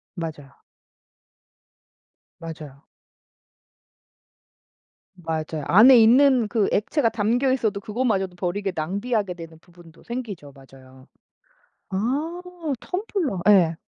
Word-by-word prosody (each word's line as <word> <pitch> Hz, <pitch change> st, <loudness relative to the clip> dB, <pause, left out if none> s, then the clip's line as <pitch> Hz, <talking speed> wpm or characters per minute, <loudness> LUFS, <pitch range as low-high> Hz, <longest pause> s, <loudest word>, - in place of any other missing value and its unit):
맞아요. 150 Hz, -6 st, -7 dB, 1.9 s
맞아요. 155 Hz, -3 st, -10 dB, 2.3 s
맞아요. 160 Hz, -3 st, -4 dB
안에 235 Hz, +6 st, +7 dB
있는 250 Hz, 0 st, +5 dB
그 210 Hz, -2 st, 0 dB
액체가 230 Hz, +5 st, +1 dB
담겨 230 Hz, +4 st, 0 dB
있어도 220 Hz, -6 st, 0 dB
그것마저도 205 Hz, -4 st, -2 dB
버리게 190 Hz, +2 st, -3 dB
낭비하게 200 Hz, +4 st, -2 dB
되는 165 Hz, -2 st, -11 dB
부분도 170 Hz, -1 st, -19 dB
생기죠. 210 Hz, -, -7 dB
맞아요. 130 Hz, 0 st, -17 dB, 0.8 s
아 285 Hz, -, -2 dB, 0.4 s
텀블러. 360 Hz, -, -3 dB
예 175 Hz, -5 st, +5 dB
195 Hz, 215 characters per minute, -23 LUFS, 160-240 Hz, 2.3 s, 안에